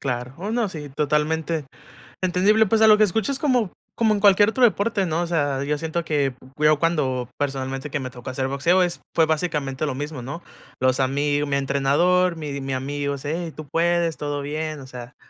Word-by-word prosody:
Claro, 125 -1 -3
oh 195 +5 -4
no, 230 -2 0
sí, 150 -5 -7
totalmente 150 +2 0 0.6
entendible, 190 +4 +3
pues, 220 +2 +1
a 220 - +7
lo 210 -1 +7
que 215 - +5
escucho 215 +5 0
es 270 - -3
como 250 - +1 0.2
como 220 -2 +3
en 205 - 0
cualquier 205 +1 +5
otro 255 +3 0
deporte, 205 -4 +2
¿no?, 165 +2 0
o - - -3
sea, 145 -5 0
yo 150 +1 0
siento 165 +1 -3
que 140 -4 0 0.2
yo, 150 0 +4
cuando 140 -6 0
personalmente 135 0 -3
que 145 0 -2
me 130 -1 -5
tocó 125 -1 -8
hacer 130 +1 -2
boxeo, 170 +7 +2
es 175 - -2
fue 165 - +5
básicamente 155 -3 -1
lo 130 - -2
mismo, 145 -2 -5
¿no?, 145 +8 -7 0.4
los 130 +1 +2
ami 145 +2 +1
mi 140 - 0
entrenador, 145 +7 +2
mi 145 -3 -5
mi 135 0 -3
amigo: 140 +2 -2
"Eh, 165 +3 -3
tú 155 -2 -8
puedes, 170 +1 +1
todo 145 -1 -3
bien", 155 +1 -4
o 130 - -11
sea, 125 -1 -10
150 Hz, 205 wpm, -23 LUFS, 140-180 Hz, 0.6 s, a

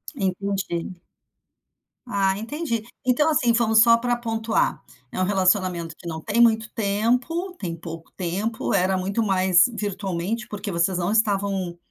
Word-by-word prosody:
Entendi. 190 -2 -2 1.1
Ah, 195 -4 0
entendi. 230 -1 -3 0.2
Então, 275 +5 +3
assim, 245 -6 +3
vamos 225 -1 +3
só 230 0 +6
para 240 +1 0
pontuar: 225 -1 -1 0.3
é - - -5
um - - +2
relacionamento 185 -3 +1
que - - -11
não 160 -1 -5
tem 225 +7 +1
muito 225 -1 +4
tempo, 245 - 0
tem 170 -4 -4
pouco 165 0 -9
tempo, 200 +5 -2
era 190 0 +2
muito 195 +5 -1
mais 185 -3 +4
virtualmente, 205 0 -3
porque 205 0 -5
vocês 175 0 +1
não 175 +2 -1
estavam, 195 -5 0
200 Hz, 140 wpm, -23 LUFS, 185-230 Hz, 1.1 s, só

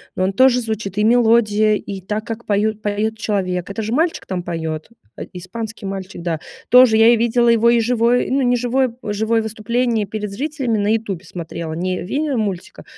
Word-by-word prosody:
но 185 - 0
он 190 +1 0
тоже 255 +1 +4
звучит: 215 -3 -4
и 210 - +2
мелодия, 220 -2 +4
и 200 -2 -6
так, 210 +3 -4
как 230 0 -6
поют 210 +1 0
поёт 215 +1 -1
человек. 185 -5 -2
Это 200 +3 -4
же 220 - -3
мальчик 325 +5 0
там 185 -2 -3
поёт, 160 -1 -4 0.3
э, - - -7
испанский 210 +4 -7
мальчик, 190 -2 -6
да. 165 -3 -2 0.3
Тоже 250 -3 +7
я 225 +1 +6
и - - +2
видела 235 +1 +2
его 230 0 +4
и 235 0 +4
живое 240 +1 +1
ну, 275 +1 +2
не 245 -1 +2
живое 250 0 0
живое 220 +2 0
выступление 225 0 -1
перед 210 0 -5
зрителями 260 -1 -2
на 205 - 0
"Ютубе" 200 -6 -3
смотрела, 165 -2 -6
не 185 +2 -2
видео 280 - -2
мультика, 195 -5 -4
220 Hz, 190 wpm, -19 LUFS, 195-235 Hz, 0.3 s, Тоже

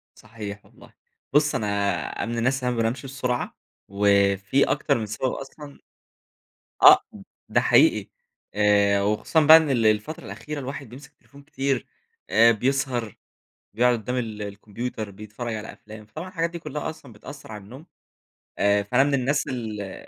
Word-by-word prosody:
صحيح 105 -2 -9
والله. - - -19 0.4
بُص 150 0 +3
أنا 100 -1 -1
من 115 +1 -4
الناس 130 +3 +1
اللي 125 0 0
مابنامش 115 +3 -1
بسرعة 125 -2 -3 0.3
وفي 100 +4 +2
أكتر - - +1
من 110 - -3
سبب 110 +5 -2
أصلًا، 140 +1 -10 1.0
آه - - +10
ب - - -12 0.3
ده - - +3
حقيقي - - +4 0.5
آآ 100 -1 +3
وخصوصًا 105 +10 +1
بقى 160 +2 +11
إن 160 -3 0
ال 120 -4 +1
الفترة 110 +9 0
الأخيرة 115 +10 -7
الواحد 135 -1 -7
بيمسك 135 +4 -12
التليفون 140 +5 -19
كتير 140 -4 -2 0.4
آآ، 115 +1 +6
بيسهر 125 -1 -1 0.6
بيقعد 120 +3 +3
قدّام 125 +4 -4
ال 110 -4 -4
الكمبيوتر 105 +2 -6
بيتفرج 105 +3 -6
على 110 0 -7
أفلام 110 0 -13
فطبعًا 155 - -8
الحاجات 170 -3 -1
دي 170 0 -7
كلّها 150 -2 -5
أصلًا 140 -6 -11
بتأثر 115 +4 -11
على 105 -2 -8
النوم. 130 +10 -12 0.7
آآ 100 0 +2
فأنا 125 +6 +3
من 145 0 0
الناس 140 +2 0
اللي 105 -6 -6
115 Hz, 150 wpm, -24 LUFS, 105-135 Hz, 1.0 s, بقى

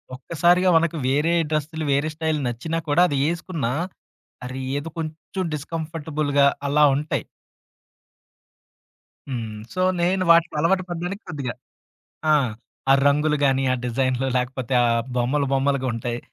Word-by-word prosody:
ఒక్కసారిగా 175 +7 +2
మనకు 165 0 +2
వేరే 150 +5 +2 0.2
డ్రెస్సులు, 155 +1 -2
వేరే 140 +3 +1
స్టైల్ 160 -1 -1
నచ్చినా 125 +8 -3
కూడా, 145 +4 +4
అది 145 - -1
ఏసుకున్నా, 165 -7 -3 0.7
అరే! 130 +1 -5 0.2
ఏదో 155 +3 -7
కొంచెం 160 +4 -5
డిస్కంఫర్టబుల్‌గా 155 -2 -1 0.2
అలా 150 +1 +4
ఉంటాయి. 150 +2 -2 2.0
హ్మ్. 115 -5 -4 0.2
సో, 185 - -1 0.2
నేను 185 +2 +2
వాటిలో 170 -1 +4
అలవాటు 185 +3 +2
పడ్డానికి 175 +4 -4
కొద్దిగా 140 -7 -4 0.8
ఆ! - - +6 0.6
ఆ - - +8
రంగులు 150 +1 +2
గాని, 135 0 +2
ఆ - - +1
డిజైనులు 130 +1 0
లేకపోతే 125 0 -3
ఆ - - +3 0.3
బొమ్మలు, 130 +4 +1
బొమ్మలుగుంటాయి. 130 -3 0
150 Hz, 120 wpm, -23 LUFS, 130-165 Hz, 2.0 s, ఆ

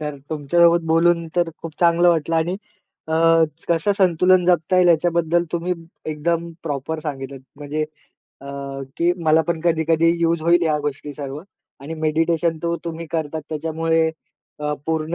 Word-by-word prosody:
तर 150 -1 -4
तुमच्यासोबत 170 +3 +3
बोलून 170 +1 +3
तर 175 -1 +2
खूप 165 - -6
चांगलं 170 0 +4
वाटलं 165 -1 +1
आणि 170 +3 0 0.5
अ, 160 - -2 0.6
कसं 170 +4 +2
संतुलन 185 -1 +3
जपता 175 0 +2
येईल 180 -1 +5
याच्याबद्दल 170 0 +2
तुम्ही 175 +1 -1 0.4
एकदम 170 +2 -1
प्रॉपर 150 +1 -3
सांगितलं, 135 -3 -6 0.2
म्हणजे 150 +1 -3 0.6
अ, 140 - -10 0.5
की 170 +1 +2
मला 160 +1 +4
पण 170 -1 0
कधी-कधी 165 0 +2
युज 165 -1 +1
होईल 170 +1 +4
ह्या 155 -2 +1
गोष्टी 145 0 -4
सर्व. 140 +1 -6 0.4
आणि 150 +4 -6
मेडिटेशन 160 +1 0
तो 170 0 0
तुम्ही 165 0 -5
करताच, 160 -1 -2
त्याच्यामुळे 160 +1 0 0.5
अ, 150 0 -1
पूर्ण 160 0 -1
165 Hz, 145 wpm, -21 LUFS, 155-170 Hz, 0.6 s, येईल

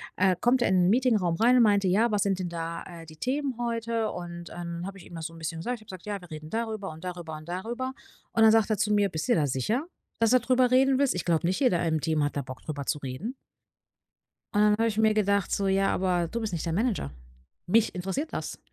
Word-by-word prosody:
Äh, 185 -1 +3
kommt 245 +1 +3
er - - +2
in 180 -2 +4
'n - - +4
Meetingraum 215 -7 +2
rein 240 +7 +4
und - - +6
meinte: 200 -3 +3
„Ja, 210 +6 +3
was 205 -2 +2
sind 195 -2 0
denn 180 -2 -3
da, 165 0 -4
äh, 170 -2 -10
die 155 -1 -14
Themen 265 - -2
heute?“ 230 -2 -1
Und, 175 -1 -7
ähm, - - -11
dann 170 +1 -5
habe 195 0 -8
ich 180 - -13
ihm - - -14
das 165 -1 -4
so 165 - -14
'n 165 - -12
bisschen 160 0 -4
gesagt. 245 +9 -2
Ich - - -19
habe 190 -4 -9
gesagt: - - -20
„Ja, 205 -1 -3
wir 180 -1 -14
reden 155 0 -8
darüber 220 -2 -3
und 160 +2 -10
darüber 175 -3 -6
und 155 +1 -13
darüber.“ 235 +9 -4 0.4
Und 225 - +2
dann 220 - +8
sagt 225 -1 +3
er 215 - +2
zu 210 0 +1
mir: 205 -1 +3
„Bist 160 -3 -4
du 245 - +4
dir - - +3
da - - +2
sicher, 210 - -1 0.3
dass 230 -1 +3
du 255 - +6
darüber 250 +1 +2
reden 265 +1 +4
willst? 280 -1 +2
Ich 180 - -3
glaube 170 -1 +1
nicht, 185 - 0
jeder 180 -11 +2
im 160 -1 0
Team 155 -1 +1
hat 145 - -1
da - - 0
Bock, 130 -1 -9
darüber 145 -3 -5
zu - - +1
reden.“ 140 - -5 1.2
Und, 205 - +3
dann 210 0 +5
habe 225 +2 +2
ich 215 -2 -2
mir 220 0 +4
gedacht, 200 -2 +1
so: 200 - 0
„Ja, 195 0 +2
aber 180 -2 +1
du 230 +8 -4
bist 220 -4 -3
nicht 170 - -3
der 165 - -1
Manager. 210 - 0 0.5
Mich 220 +4 +2
interessiert 195 - -3
das.“ - - -4
195 Hz, 270 wpm, -27 LUFS, 170-230 Hz, 1.2 s, dann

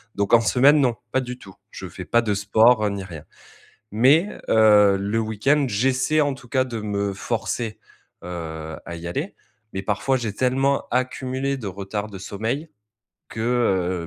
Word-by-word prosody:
Donc, 100 +2 -1
en 115 - +7
semaine, 140 +6 +4
non, 125 -3 +2 0.2
pas 130 - +2
du 125 0 -6
tout. 95 -5 -14 0.2
Je - - -8
fais - - -8
pas 120 - +3
de 110 -3 -1
sport, 110 +2 +3
ni 100 -1 -4
rien. 85 -5 -9 0.7
Mais, 145 - +3
heu, 105 -2 +5
le 100 +3 -1
week-end, 115 +7 +1
j'essaie 130 +7 +1
en 145 -2 +1
tout 130 -1 -14
cas 130 +1 +2
de 120 -3 -5
me 100 -1 -2
forcer, 115 +2 -3 0.4
heu, 80 -2 -6
à 85 - -6
y 85 +1 -7
aller. 145 - -4 0.4
Mais, 95 - -4
parfois 135 +7 0
j'ai 115 -5 -3
tellement 135 +5 +1
accumulé 130 +2 -1
de 120 - -7
retard 100 +2 -4
de 100 -2 -9
sommeil 115 - -4 0.6
que, - - -10
heu, 95 -8 0
110 Hz, 170 wpm, -23 LUFS, 100-130 Hz, 0.7 s, en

